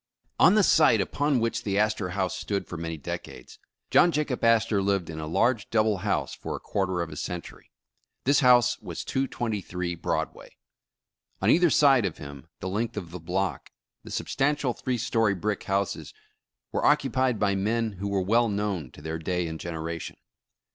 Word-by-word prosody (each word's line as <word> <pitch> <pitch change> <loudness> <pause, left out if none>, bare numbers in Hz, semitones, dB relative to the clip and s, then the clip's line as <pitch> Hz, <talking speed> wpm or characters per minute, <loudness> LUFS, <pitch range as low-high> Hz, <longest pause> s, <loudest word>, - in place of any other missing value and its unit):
ON 185 - +7
the 215 - +5
site 155 - +5
upon 140 +7 +1
which 115 0 -1
the 100 -3 -1
Astor 105 -3 +1
House 95 -2 0
stood 100 -1 -3
for - - -8
many 80 -1 -4
decades, 65 -3 -8 0.3
John 175 - +6
Jacob 145 -5 -2
Astor 115 -3 +3
lived 95 -4 0
in 80 - -6
a 75 - -5
large 115 +6 +1
double 110 -2 +2
house - - -1
for - - -5
a - - -6
quarter 95 -3 -1
of 80 - -8
a - - -7
century. 90 -1 -6 0.5
This 140 +2 +4
house 125 -2 +5
was - - -6
223 105 -9 -2
Broadway. 85 - -4 0.8
On - - +3
either 175 0 +5
side 135 -8 +5
of 90 - -7
him 70 +1 -10
the 95 - -3
length 110 +4 -2
of 85 -5 -5
the 90 - -7
block, 90 +3 -2 0.3
the - - -11
substantial 140 -2 0
three 125 +1 -2
story 115 -3 +1
brick 100 +2 -2
houses 100 0 -2 0.6
were - - -1
occupied 130 -4 +2
by 100 -1 +1
men 110 +3 0
who 100 - -3
were 100 -2 0
well 115 +4 +3
known 100 -8 -2
to 75 - -13
their 80 +1 -4
day 90 +2 -1
and 80 -1 -5
generation. 85 -1 -5
105 Hz, 175 wpm, -27 LUFS, 90-120 Hz, 0.8 s, ON